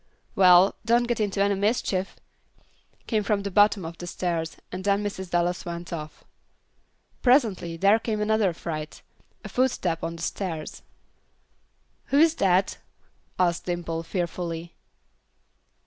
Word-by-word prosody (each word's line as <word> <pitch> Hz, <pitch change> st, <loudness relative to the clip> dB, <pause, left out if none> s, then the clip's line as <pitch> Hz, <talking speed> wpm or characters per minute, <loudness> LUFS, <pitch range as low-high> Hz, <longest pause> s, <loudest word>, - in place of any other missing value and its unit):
"Well, 185 Hz, 0 st, +6 dB
don't 235 Hz, +2 st, +3 dB
get 240 Hz, -1 st, -1 dB
into 200 Hz, -2 st, +1 dB
any 200 Hz, 0 st, +2 dB
mischief," 195 Hz, -2 st, -1 dB, 0.9 s
came 220 Hz, -3 st, 0 dB
from 200 Hz, -1 st, 0 dB
the 200 Hz, -, -4 dB
bottom 205 Hz, -1 st, +4 dB
of 165 Hz, +1 st, -8 dB
the 175 Hz, -, -6 dB
stairs, 170 Hz, -2 st, -3 dB
and 185 Hz, +1 st, -5 dB
then 200 Hz, +1 st, +1 dB
Mrs. 190 Hz, -3 st, -5 dB
Dallas 175 Hz, 0 st, 0 dB
went 170 Hz, -1 st, -6 dB
off. 155 Hz, -2 st, -7 dB, 1.0 s
Presently 220 Hz, -, +2 dB
there 200 Hz, +5 st, +4 dB
came 220 Hz, -1 st, -2 dB
another 210 Hz, -2 st, +2 dB
fright: 155 Hz, -2 st, -6 dB, 0.4 s
a -, -, -4 dB
footstep 190 Hz, -11 st, 0 dB
on 165 Hz, 0 st, -3 dB
the 165 Hz, -, -8 dB
stairs. 165 Hz, -6 st, -4 dB, 1.2 s
"Who 280 Hz, -, +1 dB
is 320 Hz, +1 st, +6 dB
that?" 190 Hz, 0 st, +2 dB, 0.6 s
asked 175 Hz, -2 st, +1 dB
Dimple, 170 Hz, -2 st, -2 dB
fearfully. 170 Hz, -1 st, -4 dB
185 Hz, 130 wpm, -25 LUFS, 170-210 Hz, 1.2 s, Well